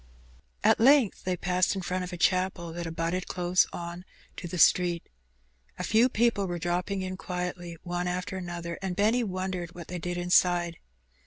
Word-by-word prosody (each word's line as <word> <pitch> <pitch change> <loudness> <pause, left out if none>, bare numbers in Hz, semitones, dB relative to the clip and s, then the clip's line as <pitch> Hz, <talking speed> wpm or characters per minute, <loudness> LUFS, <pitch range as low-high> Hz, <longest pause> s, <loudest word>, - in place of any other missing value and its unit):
At - - +5
length 260 -2 +4
they 185 -1 0
paused 180 +2 +1
in 190 - -4
front 185 +1 -2
of 180 - -6
a 175 - -5
chapel 185 -2 +1
that 170 0 -4
abutted 165 +2 -2
close 180 0 +2
on 175 +1 -6 0.3
to 175 - -5
the 180 - -5
street. 175 0 +4 0.7
A 180 - -4
few 225 +6 +4
people 230 -4 +1
were 175 -1 -3
dropping 180 +3 -1
in 185 0 -4
quietly 180 -2 -5
one 175 0 -2
after 180 +2 -3
another, 175 -2 -5
and 190 -2 -3
Benny 220 +5 +2
wondered 185 -3 -4
what 170 -2 -9
they 180 - -4
did 175 +1 -3
inside. 175 -1 +2
180 Hz, 175 wpm, -28 LUFS, 175-185 Hz, 0.7 s, At